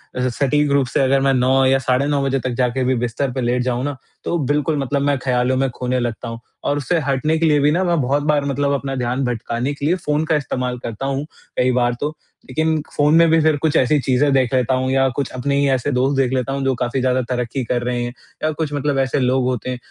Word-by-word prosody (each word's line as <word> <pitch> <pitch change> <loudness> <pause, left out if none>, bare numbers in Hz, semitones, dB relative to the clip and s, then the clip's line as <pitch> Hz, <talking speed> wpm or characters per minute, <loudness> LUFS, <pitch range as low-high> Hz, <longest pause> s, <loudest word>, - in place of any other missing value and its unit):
अ, 125 0 0
सटीक 145 +3 +1
रूप 140 -2 +2
से - - 0
अगर 135 0 +3
मैं 135 0 +3
9 130 +1 +3
या 135 +1 +3
साढ़े 130 +1 +1
9 145 -1 +1
बजे 135 0 0
तक 130 - -3
जाके 130 0 0
भी 130 +1 +1
बिस्तर 125 +3 -2
पे 130 - -2
लेट 125 +1 +1
जाऊँ 125 0 -1
ना, 145 -1 -3 0.3
तो 170 - -1
बिल्कुल 150 +3 0
मतलब 140 +1 -1
मैं 140 0 +1
ख़्यालों 125 0 0
में 135 0 +1
खोने 125 0 -1
लगता 120 0 -3
हूँ 115 0 -6 0.3
और 145 - +1
उससे 165 +4 0
हटने 145 +2 0
के 165 - +1
लिए 150 -2 +4
भी 145 +1 +3
ना, 175 +4 +1
मैं 170 -4 +1
बहुत 140 +3 0
बार 150 -1 +1
मतलब 140 0 0
अपना 135 -1 -2
ध्यान 125 +1 -1
भटकाने 120 +2 -2
के 140 0 -5
लिए 170 +4 +3
फ़ोन 155 -3 -1
का 160 - +1
इस्तेमाल 125 -4 -2
करता 115 +3 -5
हूँ, 140 +1 -2 0.3
कई 130 0 +3
बार 120 -1 +1
तो। 150 +2 -2 0.3
लेकिन 155 +3 0
फ़ोन 150 +1 +3
में 165 0 +6
भी 165 +1 +4
फिर 155 -1 +3
कुछ 155 0 0
ऐसी 140 +4 +3
चीजें 135 +2 +2
देख 130 -2 +2
लेता 130 0 +2
हूँ 130 0 -1
या 135 0 +3
कुछ 135 +1 -3
अपने 135 +3 -1
ही 140 - +2
ऐसे 130 +2 0
दोस्त 135 +2 +1
देख 130 -2 +2
लेता 130 +1 -1
हूँ, 135 0 -2
जो 135 0 +2
काफ़ी 125 +2 -2
ज़्यादा 130 0 +1
तरक्की 125 +1 -2
कर 120 +1 -1
रहे 120 0 -1
हैं 120 0 -4 0.3
या 155 - +2
कुछ 150 -1 -3
मतलब 145 -1 -1
ऐसे 135 +1 +1
लोग 130 0 +2
होते 125 -1 -2
हैं, 125 - -3
135 Hz, 260 wpm, -20 LUFS, 125-145 Hz, 0.3 s, में